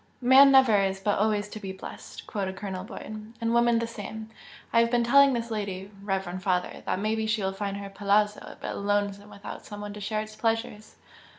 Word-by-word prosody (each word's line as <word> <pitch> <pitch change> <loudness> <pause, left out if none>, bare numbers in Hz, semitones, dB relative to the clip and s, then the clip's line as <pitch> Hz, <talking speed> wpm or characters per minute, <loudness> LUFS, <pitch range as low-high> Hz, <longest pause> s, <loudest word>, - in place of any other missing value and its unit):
"'Man 265 +2 +7
never 260 -6 +6
is 195 -1 0
but 205 +1 0
always 210 -1 +1
to 215 - -7
be 195 -2 -5
blest'!" 190 - -10
quoted 190 -3 -3
Colonel 190 -2 -5
Boyd 215 +2 -9
"And 230 0 0
woman 235 0 +4
the 230 - 0
same! 220 -1 -8 0.4
I 230 - +6
have 230 0 +4
been 240 0 +2
telling 275 +3 +6
this 235 -1 -3
lady, 200 -2 -4
reverend 190 -2 -3
father, 185 -2 -1
that - - 0
maybe 220 +2 -1
she 215 -1 0
will 190 - 0
find 200 0 -3
her 200 0 -6
'palazzo' 205 +1 +1
a - - -19
bit - - -4
lonesome 205 0 -1
without 200 -1 -9
some 205 - -9
one 205 0 -6
to 210 - -9
share 215 +1 -1
its 215 0 -9
pleasures." 225 -1 -2
210 Hz, 210 wpm, -27 LUFS, 200-225 Hz, 0.4 s, Man